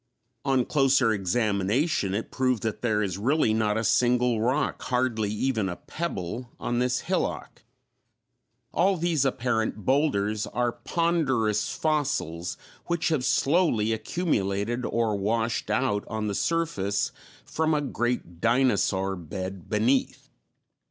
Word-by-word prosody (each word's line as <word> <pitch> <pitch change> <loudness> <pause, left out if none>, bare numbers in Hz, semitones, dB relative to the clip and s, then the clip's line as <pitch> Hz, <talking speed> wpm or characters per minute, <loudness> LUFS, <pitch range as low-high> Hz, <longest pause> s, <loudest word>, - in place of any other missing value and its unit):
On 135 -3 +2
closer 135 -4 +3
examination, 100 - 0
it 110 - -4
proved 130 -4 0
that 110 -2 -2
there 110 -3 +1
is 95 -1 -3
really 125 0 +2
not 110 -1 +1
a 110 - 0
single 120 -1 +2
rock, 130 +6 0
hardly 125 -4 0
even 110 -2 0
a 90 - -4
pebble, 120 - -5
on 120 - -1
this 125 0 +1
hillock; - - -2 1.1
all 190 +1 +3
these 160 -4 +1
apparent 120 -5 -1
boulders 110 -7 +1
are 120 -1 0
ponderous 135 -11 0
fossils 145 - -1 0.3
which 170 -1 0
have 155 -6 0
slowly 135 - +2
accumulated 110 - -1
or 115 -2 0
washed 110 +3 -1
out 105 -1 +1
on 110 -1 -3
the 105 - -1
surface 105 - 0 0.3
from 160 0 0
a - - +2
great 120 - -2
dinosaur 100 -6 +2
bed 95 +2 -6
beneath. 115 +5 0
115 Hz, 125 wpm, -26 LUFS, 105-135 Hz, 1.1 s, closer